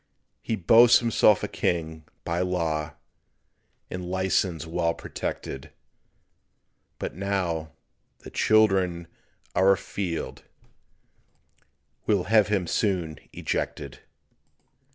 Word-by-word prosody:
He 115 Hz, -, -2 dB
boasts 115 Hz, +5 st, +6 dB
himself 115 Hz, -3 st, +3 dB
a -, -, 0 dB
King 80 Hz, -2 st, -2 dB, 0.2 s
by 85 Hz, +1 st, -2 dB
law 80 Hz, -4 st, -1 dB, 1.0 s
And 90 Hz, -1 st, -5 dB
license 95 Hz, -3 st, 0 dB
well 85 Hz, 0 st, -1 dB
protected; 65 Hz, -, -6 dB, 1.3 s
But -, -, -5 dB
now 90 Hz, -4 st, -2 dB, 0.5 s
"the -, -, -10 dB
children 95 Hz, -6 st, +3 dB, 0.5 s
are 95 Hz, +1 st, +5 dB
a 95 Hz, -, +4 dB
field" 90 Hz, -5 st, -4 dB, 1.7 s
We'll 100 Hz, -4 st, +2 dB
have 105 Hz, +1 st, +4 dB
him 100 Hz, -4 st, 0 dB
soon 85 Hz, -6 st, -1 dB
ejected. -, -, -4 dB
90 Hz, 90 wpm, -26 LUFS, 85-100 Hz, 1.7 s, boasts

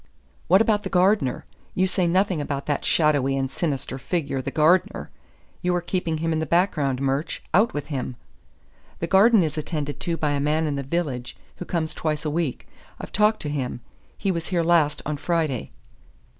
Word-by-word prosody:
"What 190 Hz, +4 st, +6 dB
about 215 Hz, -2 st, +2 dB
the -, -, -5 dB
gardener? 185 Hz, -6 st, +2 dB, 0.3 s
You 185 Hz, -, +3 dB
say 185 Hz, -1 st, +1 dB
nothing 185 Hz, -2 st, +2 dB
about 140 Hz, -1 st, -3 dB
that 145 Hz, -2 st, -1 dB
shadowy 145 Hz, -4 st, +2 dB
and 135 Hz, 0 st, -1 dB
sinister 135 Hz, -3 st, -3 dB
figure, 140 Hz, -3 st, -2 dB
the -, -, -4 dB
gardener. 160 Hz, +4 st, +2 dB, 0.5 s
You 180 Hz, -1 st, +1 dB
are 175 Hz, -, 0 dB
keeping 175 Hz, -2 st, -2 dB
him 165 Hz, +1 st, -1 dB
in 160 Hz, -, 0 dB
the 160 Hz, -, -2 dB
background, 150 Hz, -6 st, +1 dB
Murch. 135 Hz, +3 st, -1 dB
Out 210 Hz, +3 st, +3 dB
with 145 Hz, -, -3 dB
him!" 130 Hz, -2 st, -3 dB, 0.8 s
"The -, -, -2 dB
garden 195 Hz, +4 st, +5 dB
is 155 Hz, -1 st, -2 dB
attended 145 Hz, -3 st, -4 dB
to 170 Hz, -1 st, -2 dB
by 150 Hz, -2 st, 0 dB
a 145 Hz, -, 0 dB
man 155 Hz, +3 st, +1 dB
in 150 Hz, -2 st, -1 dB
the 140 Hz, -, -2 dB
village, 135 Hz, -4 st, -3 dB, 0.2 s
who 180 Hz, -, -6 dB
comes 160 Hz, -3 st, -2 dB
twice 155 Hz, -1 st, -2 dB
a 150 Hz, -, 0 dB
week. 160 Hz, -4 st, -2 dB, 0.3 s
I've -, -, -8 dB
talked 210 Hz, +1 st, +2 dB
to 150 Hz, -, -3 dB
him. 130 Hz, -4 st, -3 dB, 0.4 s
He 195 Hz, -, 0 dB
was 170 Hz, -2 st, -3 dB
here 175 Hz, -3 st, +1 dB
last 165 Hz, -3 st, +2 dB
on 150 Hz, 0 st, -2 dB
Friday." 155 Hz, -6 st, -1 dB
155 Hz, 190 wpm, -24 LUFS, 140-180 Hz, 0.8 s, What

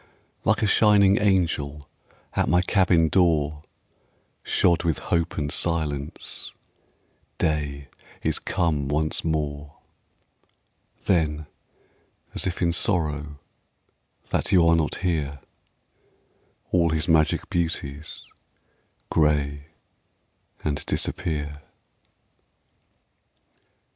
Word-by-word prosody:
Like -, -, +2 dB
a -, -, +4 dB
shining 100 Hz, -1 st, +5 dB
angel 80 Hz, -7 st, 0 dB, 0.5 s
At -, -, +1 dB
my 90 Hz, +1 st, +4 dB
cabin 90 Hz, -4 st, +3 dB
door, 80 Hz, -4 st, +2 dB, 0.8 s
Shod 85 Hz, -1 st, +2 dB
with 80 Hz, -4 st, +1 dB
hope 85 Hz, -1 st, -1 dB
and 75 Hz, -1 st, -1 dB
silence, 75 Hz, -4 st, -3 dB, 0.8 s
Day 70 Hz, -2 st, -1 dB, 0.4 s
is -, -, +1 dB
come 75 Hz, -5 st, 0 dB
once 75 Hz, +2 st, -1 dB
more. 75 Hz, -2 st, -2 dB, 1.3 s
Then, 80 Hz, -4 st, +1 dB, 0.9 s
as -, -, -2 dB
if 90 Hz, 0 st, -2 dB
in 85 Hz, 0 st, +2 dB
sorrow 75 Hz, -7 st, 0 dB, 0.9 s
That -, -, 0 dB
you 90 Hz, -4 st, +5 dB
are 85 Hz, -, +5 dB
not 80 Hz, -2 st, 0 dB
here, 75 Hz, -5 st, -1 dB, 1.3 s
All 85 Hz, -2 st, +3 dB
his 80 Hz, +2 st, 0 dB
magic 80 Hz, -2 st, +2 dB
beauties 80 Hz, -4 st, -3 dB, 0.9 s
Gray 75 Hz, -2 st, +1 dB, 1.0 s
and 75 Hz, -1 st, -1 dB
disappear. 75 Hz, -2 st, -2 dB
80 Hz, 90 wpm, -25 LUFS, 75-85 Hz, 1.3 s, shining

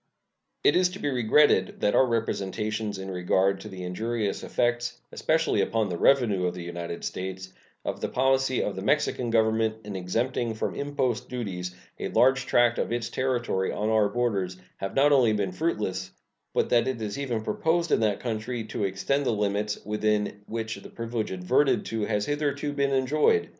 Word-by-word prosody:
It -, -, +5 dB
is 180 Hz, 0 st, +4 dB
to 190 Hz, +2 st, -9 dB
be 145 Hz, -, -1 dB
regretted 120 Hz, -5 st, +3 dB
that 105 Hz, -, +2 dB
our 130 Hz, -, +5 dB
representations 105 Hz, -2 st, -2 dB
in 95 Hz, 0 st, -6 dB
regard 95 Hz, +2 st, +1 dB
to -, -, -8 dB
the 95 Hz, -1 st, -7 dB
injurious 105 Hz, +3 st, -2 dB
effects, 120 Hz, 0 st, -1 dB
especially -, -, +1 dB
upon 110 Hz, -3 st, 0 dB
the 85 Hz, -, -3 dB
revenue 105 Hz, -9 st, +3 dB
of 90 Hz, -, -3 dB
the 90 Hz, -, -6 dB
United 85 Hz, 0 st, -5 dB
States, 95 Hz, 0 st, -5 dB, 0.3 s
of -, -, -3 dB
the -, -, -1 dB
policy 135 Hz, 0 st, +2 dB
of 100 Hz, -, -2 dB
the 95 Hz, -, -5 dB
Mexican 125 Hz, 0 st, +1 dB
Government 110 Hz, -1 st, +2 dB
in 105 Hz, -2 st, -6 dB
exempting 115 Hz, +5 st, -1 dB
from -, -, -2 dB
impost 135 Hz, -5 st, -2 dB
duties 90 Hz, -7 st, -4 dB, 0.2 s
a -, -, -2 dB
large 130 Hz, 0 st, +3 dB
tract 120 Hz, -2 st, +3 dB
of -, -, -1 dB
its 120 Hz, 0 st, -1 dB
territory 120 Hz, -7 st, 0 dB
on 105 Hz, +1 st, -1 dB
our 110 Hz, -2 st, +3 dB
borders 100 Hz, -6 st, -1 dB, 0.2 s
have 95 Hz, 0 st, -5 dB
not 145 Hz, +2 st, +5 dB
only 125 Hz, -6 st, +5 dB
been 100 Hz, -3 st, -1 dB
fruitless, 95 Hz, -, -2 dB, 0.4 s
but -, -, +1 dB
that 120 Hz, 0 st, +4 dB
it 130 Hz, -3 st, -2 dB
is 110 Hz, +3 st, -4 dB
even 120 Hz, -6 st, -2 dB
proposed 165 Hz, +6 st, 0 dB
in -, -, +4 dB
that 105 Hz, -3 st, +1 dB
country 115 Hz, 0 st, -3 dB
to 110 Hz, -, -4 dB
extend 100 Hz, +9 st, 0 dB
the -, -, 0 dB
limits 105 Hz, 0 st, -1 dB
within 105 Hz, -1 st, 0 dB
which 115 Hz, 0 st, -4 dB
the -, -, -11 dB
privilege 115 Hz, -1 st, -3 dB
adverted 110 Hz, +10 st, +2 dB
to 110 Hz, -2 st, -2 dB
has 105 Hz, -1 st, 0 dB
hitherto 145 Hz, 0 st, -1 dB
been 140 Hz, -1 st, +1 dB
enjoyed. 145 Hz, -, +2 dB
110 Hz, 180 wpm, -27 LUFS, 100-130 Hz, 0.4 s, It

